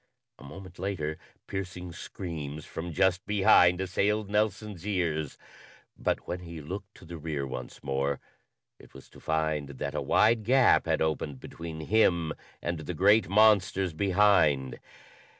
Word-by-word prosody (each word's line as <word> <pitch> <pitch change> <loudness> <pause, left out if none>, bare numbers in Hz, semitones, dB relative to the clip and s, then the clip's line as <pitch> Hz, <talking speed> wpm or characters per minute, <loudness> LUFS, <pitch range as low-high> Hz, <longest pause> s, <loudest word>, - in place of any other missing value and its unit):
A - - -13
moment 90 +5 -11
later, 85 -5 -3 0.3
piercing 90 -2 -6
screams 80 -4 -7
from 85 +1 -6
just 95 +3 +2
behind 90 -3 +5
assailed 100 +3 0
Nelson's 105 -3 -1
ears, 80 -7 -1 0.6
but - - -2
when 90 - -3
he 85 -2 -9
looked 95 +7 -7
to - - -15
the 85 0 -8
rear 75 -3 -3
once 65 -2 -7
more 70 0 -1 0.6
it - - -18
was 65 - -12
to - - -16
find 80 -2 -1
that 70 - -5
a - - -2
wide 110 +1 +3
gap 130 +3 +4
had - - +1
opened 75 -3 -2
between 80 +1 -8
him 85 -3 +2 0.3
and 85 -1 -2
the 80 +3 -5
great 100 +4 +4
monsters 95 -3 +4
behind. 85 -8 +3
90 Hz, 145 wpm, -28 LUFS, 80-100 Hz, 0.6 s, behind